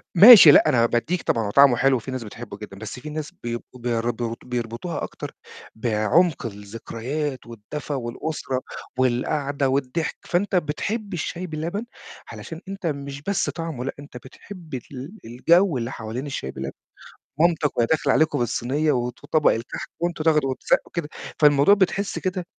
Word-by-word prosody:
ماشي 200 -4 +11
لأ، - - +6
أنا 115 -2 +4
بادّيك 135 +10 0
طبعًا 115 - 0
هو - - -3
طعمه 140 -1 +6
حلو 135 +2 +3
وفي 125 +2 -4
ناس 130 -2 -4
بتحبه 105 -1 -9
جدًا 100 -2 -10
بس 110 +4 -7
في 150 - -8
ناس 150 0 -5
بيبقوا 120 +1 -6 0.2
برضه 115 -1 -3
بيربطوها 120 +6 -4
أكتر - - -6 0.4
بعمق 120 - +1
الذكريات 115 +7 -5
والدفى 120 +6 -7
والأسرة 130 +1 -3 0.4
والقعدة 135 +2 0
والضحك، 140 +4 -1
فأنت 190 +3 0
بتحب 200 +6 -2
الشاي 180 +2 -4
بلبن 170 +8 -4 0.5
علشان 165 -1 -8
أنت 195 -1 -7
مش 140 -2 -5
بس 200 +5 -1
طعمه 165 -7 -5
لأ، 135 - -3
أنت 145 -3 -10
بتحب 160 - -12
ال 135 - -7
الجَو 165 - +3
اللي 120 +1 -3
حوالين 115 +4 -5
الشاي 140 - -4
بلبن 65 0 -5 0.7
مامتي 165 -2 +3
وهي 120 - +3
داخلة 160 +5 +1
عليكم 155 -2 +2
بالصينية 130 +5 0
وط 125 -1 -2
وطبق 150 +1 +3
الكحك 115 +2 -5
وأنتم 170 -2 -2
تاخدوا 150 -4 +3
وتسقّوا 130 - 0
كده، 165 -4 -3 0.3
فالموضوع 145 +4 +6
بتحس 200 0 0
كده، 185 -2 -3
140 Hz, 155 wpm, -23 LUFS, 120-165 Hz, 0.7 s, ماشي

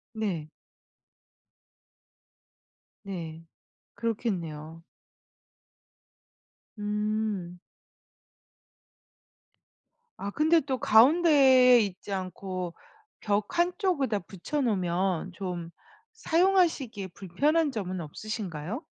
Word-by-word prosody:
네. 185 -9 -2 2.6
네. 165 -4 -7 0.5
그렇겠네요. 165 -9 -4 2.0
음. 210 -3 -2 2.6
아 200 - -4
근데 315 +6 +3
또 265 -2 -2
가운데에 260 -1 +6
있지 200 0 -4
않고 185 -1 -4 0.5
벽 205 +4 -1
한쪽에다 345 - +1
붙여 195 - -4
놓으면 185 -5 0
좀 175 -2 -5 0.4
사용하시기에 335 - +1
불편한 280 - 0
점은 185 -5 -4
없으신가요? 195 - -5
210 Hz, 150 characters per minute, -28 LUFS, 180-265 Hz, 2.6 s, 가운데에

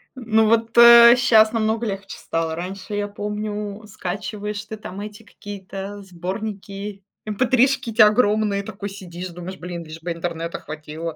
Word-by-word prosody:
Ну, 225 -3 +2
вот, 230 +1 +1
э, 235 0 +10
щас 220 -2 +5
намного 225 +1 0
легче 195 -1 -5
стало. 165 -1 -2
Раньше, 190 +4 -6
я 205 0 -1
помню, 210 0 -5
скачиваешь 205 +2 -5
ты, 220 - -7
там, 195 -2 -8
эти 210 +2 -8
какие-то 200 -1 -8
сборники, 195 +2 -6 0.2
эмпэтришки 255 +3 +2
эти 220 +1 +3
огромные 210 -2 +4
и - - -13
такой 200 +1 -6
сидишь 185 -2 -8
думаешь: 180 +2 -8
"Блин, 175 -1 -6
лишь 160 +1 -10
бы 175 +1 -4
интернета 165 0 -4
хватило". 155 +1 -7
205 Hz, 150 wpm, -22 LUFS, 185-220 Hz, 0.2 s, э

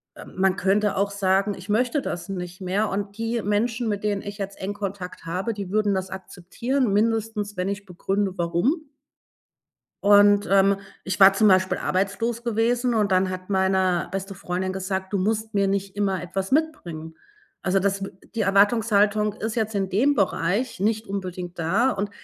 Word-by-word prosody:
äh, - - -10
man 190 0 0
könnte 205 +2 +2
auch 200 +1 +1
sagen: 200 +1 +1
„Ich 185 +2 -12
möchte 245 +7 +1
das 175 -3 -5
nicht 180 0 -6
mehr”, 195 +4 0
und 200 +1 -4
die 230 +1 -1
Menschen, 220 +3 0
mit 205 -1 -2
denen 205 -2 0
ich 205 +1 -7
jetzt 195 0 -5
engen 195 +2 -3
Kontakt 200 -4 -6
habe, 185 +7 -2
die 200 -3 -6
würden 210 -1 +2
das 190 0 -3
akzeptieren, 200 +6 -2
mindestens 215 -1 0
wenn 180 +1 -1
ich 200 0 -4
begründe, 195 +2 -1
warum. 230 - 0 1.2
Und, 205 0 +6
ähm, 195 0 +4 0.3
ich 190 -2 -3
war 195 0 +9
zum 210 +2 +4
Beispiel 185 -1 +3
arbeitslos 210 +5 -1
gewesen 240 +2 +1
und 210 -3 +1
dann 185 0 +2
hat 185 +1 -7
meine 190 -2 +2
beste 195 +1 -4
Freundin 185 0 -3
gesagt: 190 +1 -3
„Du 200 - +1
musst 220 +3 -1
mir 200 -1 +3
nicht 195 0 -2
immer 195 -3 0
etwas 190 +3 -4
mitbringen.“ 175 - -2 0.5
Also, 190 +1 +2
das 195 0 0
w 195 - -6 0.3
die 220 - +1
Erwartungshaltung 210 +1 +3
ist 220 +1 -4
jetzt 220 -2 -1
in 195 -1 0
dem 255 +10 +3
Bereich 200 +2 0
nicht 215 +3 0
unbedingt 185 -3 -5
da 195 +11 +2
und 205 -3 -2
200 Hz, 175 wpm, -24 LUFS, 190-215 Hz, 1.2 s, war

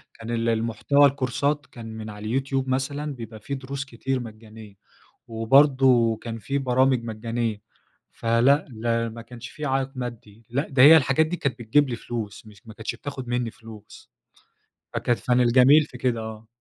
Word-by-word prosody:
كان 115 0 -10
ال 115 0 0
المحتوى 115 +5 +2
الكورسات 140 +2 0
كان 120 -2 -11
من 110 0 -7
على 105 0 -9
اليوتيوب 135 +3 -1
مثلًا 140 +3 -2
بيبقى 115 -2 -9
في 140 +6 -5
دروس 135 +1 -6
كتير 130 0 -3
مجانية، 110 -2 -11 0.5
وبرضه 125 0 +4
كان 115 +1 -7
في 135 +7 -2
برامج 130 -2 +2
مجانية، 115 -1 -3 0.5
فلأ، 120 +6 +2
لا 115 0 -1
ما 115 +1 -9
كانش 120 0 -10
في 150 - -8
عائق 135 -1 0
مادّي. 115 -3 -8
لأ، 140 +5 -1
ده 135 -3 +3
هي 155 +4 +10
الحاجات 145 +1 +3
دي 175 +3 -3
كانت 135 -7 -2
بتجيب 130 +5 +2
لي 120 - -3
فلوس 110 -3 -6
مش 105 0 -17
ما 110 - -11
كانتش 110 0 -5
بتاخد 140 -3 -7
منّي 120 -1 -1
فلوس. 110 -2 -14 0.8
فكانت 120 -1 -1
كان 125 0 +4
الجميل 130 +5 +6
في 125 - -12
كده، 125 -2 0
آه. 110 0 -8
120 Hz, 170 wpm, -24 LUFS, 115-135 Hz, 0.8 s, هي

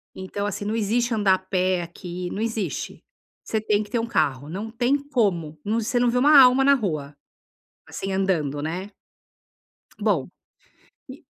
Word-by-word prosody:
Então 195 +2 -4
assim, 205 0 -3
não 215 - -1
existe 230 +2 0
andar 205 -3 +3
a - - -4
pé 185 -1 0
aqui, 175 +1 -6
não 200 - -4
existe. 225 -2 -3 0.4
Você 220 - -1
tem 210 -1 +1
que 205 - -14
ter 240 - 0
um 230 - -1
carro, 145 - 0
não 205 +6 -5
tem 245 +4 +1
como. 170 - 0
Não 220 +3 0
você 240 +2 0
não 245 0 +3
vê 250 - 0
uma 290 +3 +6
alma 255 +1 +7
na 280 +1 +6
rua, 155 - -3 0.7
assim, 195 0 -5
andando, 160 -7 0
né. 180 +6 -4 1.1
Bom, 200 -11 +1 0.8
e - - -11
205 Hz, 170 wpm, -24 LUFS, 180-230 Hz, 1.1 s, alma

